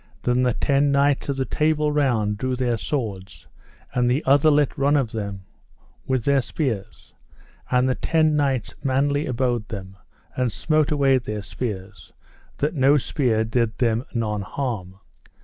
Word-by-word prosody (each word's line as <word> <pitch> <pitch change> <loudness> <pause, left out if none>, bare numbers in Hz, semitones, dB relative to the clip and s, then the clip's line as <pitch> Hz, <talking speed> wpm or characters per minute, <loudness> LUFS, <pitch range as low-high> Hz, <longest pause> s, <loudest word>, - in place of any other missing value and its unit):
Then 125 +1 +2
the 125 -2 +2
ten 140 0 +2
knights 140 0 +2
of 140 - -1
the 130 - 0
Table 150 +4 +1
Round 120 -8 +1
drew 130 +5 -2
their 125 -2 0
swords, 105 -7 -4 0.5
and 125 -1 +2
the 130 +5 +1
other 140 +3 +5
let 145 -1 +2
run 145 0 +2
at 130 -5 0
them 100 -3 -5 0.6
with 130 -3 0
their 140 -1 +3
spears, 120 -8 -4 0.6
and 125 0 +3
the 130 - +2
ten 155 +2 +1
knights 135 -6 0
manly 140 +2 +1
abode 120 -3 -1
them, 95 -4 -7 0.4
and 125 -2 0
smote 155 +3 +1
away 140 -4 +3
their 105 -4 -5
spears 100 -3 -6 0.5
that 150 +2 0
no 140 -1 +4
spear 120 -5 0
did 110 -1 0
them 115 -1 +1
none 105 -3 -2
harm. 100 -4 -4
130 Hz, 155 wpm, -23 LUFS, 110-140 Hz, 0.6 s, other